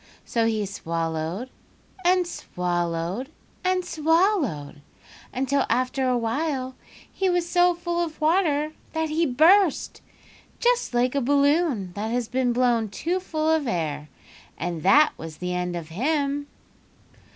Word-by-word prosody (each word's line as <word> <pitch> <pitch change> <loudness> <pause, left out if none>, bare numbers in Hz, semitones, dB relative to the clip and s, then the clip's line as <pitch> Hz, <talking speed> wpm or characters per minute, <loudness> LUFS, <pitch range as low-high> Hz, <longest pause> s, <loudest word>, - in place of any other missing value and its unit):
"So 230 -1 +1
he 215 -2 0
swallowed, 165 +4 -3 0.5
and 360 0 +3
swallowed, 175 - -3 0.3
and 370 -1 +1
SWALLOWED 320 - +1 0.5
until 270 +2 +1
after 255 +2 +1
awhile 255 +3 -1 0.4
he 385 -1 0
was 355 -1 +1
so 355 0 +3
full 345 0 -1
of 315 -2 -6
water 310 -2 +2 0.2
that 320 -1 -1
he 320 +2 +1
burst, 325 +6 +3 0.6
just 485 - +1
like 245 +1 +2
a 280 - +1
balloon 280 - +2
that 210 +3 -3
has 240 0 -1
been 250 0 0
blown 240 -3 +2
too 340 - -2
full 315 -4 -2
of 315 -4 +1
air; 155 -6 -2 0.5
and 170 -1 -3
that 290 - +5
was 160 -1 -8
the 180 0 -3
end 180 0 -2
of 165 -2 -6
him. 285 - -1
260 Hz, 130 wpm, -25 LUFS, 195-320 Hz, 0.6 s, that